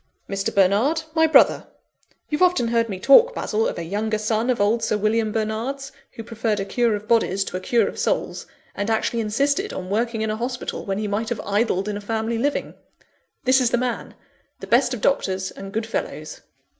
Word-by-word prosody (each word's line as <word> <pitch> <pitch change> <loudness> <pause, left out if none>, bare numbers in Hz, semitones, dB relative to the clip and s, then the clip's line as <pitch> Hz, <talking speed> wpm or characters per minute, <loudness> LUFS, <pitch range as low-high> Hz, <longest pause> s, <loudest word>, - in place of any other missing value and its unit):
Mr. 195 0 -2
Bernard 210 - +2
my 320 0 +4
brother. 315 - +4 0.6
You've 300 +2 -2
often 360 -10 +3
heard 230 -1 +1
me 190 -2 -4
talk, 465 - +6
Basil, 220 +1 0
of - - -4
a 170 - -4
younger 215 +5 -1
son 220 +2 -1
of 250 - +1
old 210 +3 +2
Sir 215 - +1
William 215 +1 +1
Bernard's, 225 +6 -3 0.2
who 225 - -8
preferred 225 -2 -2
a 195 - -2
cure 230 +2 +1
of 205 +1 -8
bodies 210 -4 +2
to 185 - -5
a - - -4
cure 235 +5 +2
of - - -6
souls; - - -1 0.3
and 200 +2 -3
actually 225 +1 0
insisted 280 - 0
on 185 0 -6
working 225 +1 0
in 220 - -1
a 215 - -3
hospital 245 +2 -4
when 195 -2 -2
he 210 0 -2
might 215 +2 -2
have 235 - -3
idled 205 -1 0
in 210 -1 -2
a - - -7
family 225 +2 -2
living. 285 +4 -1 0.7
This 260 +1 +4
is 245 - +3
the 240 - +1
man 245 -1 -3 0.4
the - - -7
best 250 +1 +3
of 225 - -9
doctors 190 -8 0
and 195 0 -9
good 220 +2 -2
fellows." 225 - -5
225 Hz, 205 wpm, -22 LUFS, 205-245 Hz, 0.7 s, talk